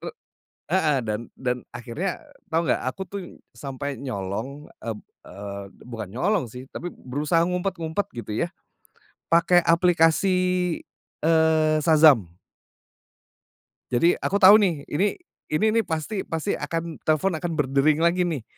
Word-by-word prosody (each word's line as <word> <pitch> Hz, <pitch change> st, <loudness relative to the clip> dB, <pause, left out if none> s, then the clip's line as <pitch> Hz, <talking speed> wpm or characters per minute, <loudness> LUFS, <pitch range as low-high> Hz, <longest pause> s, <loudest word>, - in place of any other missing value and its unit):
Rek -, -, -7 dB, 0.5 s
heeh, 155 Hz, -6 st, +2 dB
dan 110 Hz, -2 st, -3 dB, 0.2 s
dan 125 Hz, -1 st, -1 dB, 0.2 s
akhirnya 140 Hz, +11 st, -4 dB, 0.3 s
tahu 165 Hz, -, +3 dB
nggak -, -, +1 dB
aku 190 Hz, -, -7 dB
tuh 200 Hz, 0 st, -5 dB, 0.4 s
sampai 140 Hz, 0 st, -5 dB
nyolong 125 Hz, +4 st, -5 dB, 0.2 s
eb 110 Hz, -2 st, -4 dB, 0.2 s
eee, 100 Hz, +1 st, -7 dB, 0.2 s
bukan 115 Hz, -5 st, -7 dB
nyolong 180 Hz, -, +1 dB
sih 125 Hz, +3 st, -9 dB
tapi 175 Hz, -, -6 dB
berusaha 150 Hz, +6 st, -1 dB
ngumpet-ngumpet 180 Hz, 0 st, -2 dB
gitu 115 Hz, -2 st, -5 dB
ya -, -, -5 dB, 0.8 s
pake 175 Hz, +1 st, +5 dB
aplikasi, 170 Hz, +2 st, +3 dB, 0.9 s
eee, 160 Hz, -1 st, +3 dB
Shazam. 150 Hz, -, +6 dB, 1.6 s
Jadi, 165 Hz, +8 st, +3 dB
aku 200 Hz, -, -1 dB
tahu 205 Hz, +1 st, +8 dB
nih 170 Hz, -9 st, +1 dB
ini 190 Hz, +8 st, +1 dB, 0.3 s
ini 155 Hz, +8 st, +1 dB
nih -, -, +1 dB
pasti 165 Hz, +6 st, -3 dB
pasti 165 Hz, +5 st, -2 dB
akan 165 Hz, -1 st, -4 dB
telepon 155 Hz, +5 st, +2 dB
akan 175 Hz, -1 st, -3 dB
berdering 150 Hz, +2 st, +2 dB
lagi 175 Hz, +1 st, +3 dB
nih 150 Hz, -9 st, -3 dB
160 Hz, 130 wpm, -24 LUFS, 130-175 Hz, 1.6 s, tahu